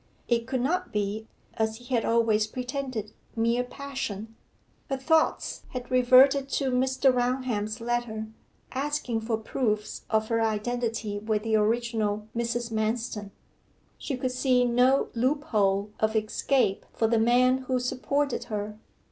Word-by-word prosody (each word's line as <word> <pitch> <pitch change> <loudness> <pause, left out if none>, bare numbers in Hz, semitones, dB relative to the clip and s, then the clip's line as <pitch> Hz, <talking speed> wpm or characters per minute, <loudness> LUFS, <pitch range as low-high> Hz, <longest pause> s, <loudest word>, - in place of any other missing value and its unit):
It 235 -1 +1
could 260 -2 -1
not 360 +8 0
be, 210 +1 -2 0.3
as 220 0 0
he 245 +3 -8
had 235 - +2
always 225 -2 +2
pretended, 250 -3 -4 0.2
mere 230 +2 +2
passion. 245 -5 -6 0.5
Her 270 - 0
thoughts 315 +4 +1
had 250 -1 -6
reverted 260 +2 +6
to 270 -1 0
Mr. 260 +1 +3
Raunham's 245 -3 -1
letter, 235 -2 -2 0.5
asking 270 -4 -1
for 225 0 -1
proofs 215 -2 -2
of 220 0 +1
her 230 -1 +1
identity 225 -1 -1
with 215 0 -1
the 225 -1 +1
original 215 -1 0
Mrs. 235 0 -2
Manston. 220 -1 -2 0.7
She 270 - -3
could 255 0 -1
see 255 -1 +2
no 250 +3 +3
loophole 215 -6 +1
of 220 0 +1
escape 215 0 +1
for 225 - +1
the 225 0 +3
man 250 +3 +4
who 255 -1 +2
supported 275 +2 -1
her. 210 -1 -4
235 Hz, 135 wpm, -27 LUFS, 220-255 Hz, 0.7 s, reverted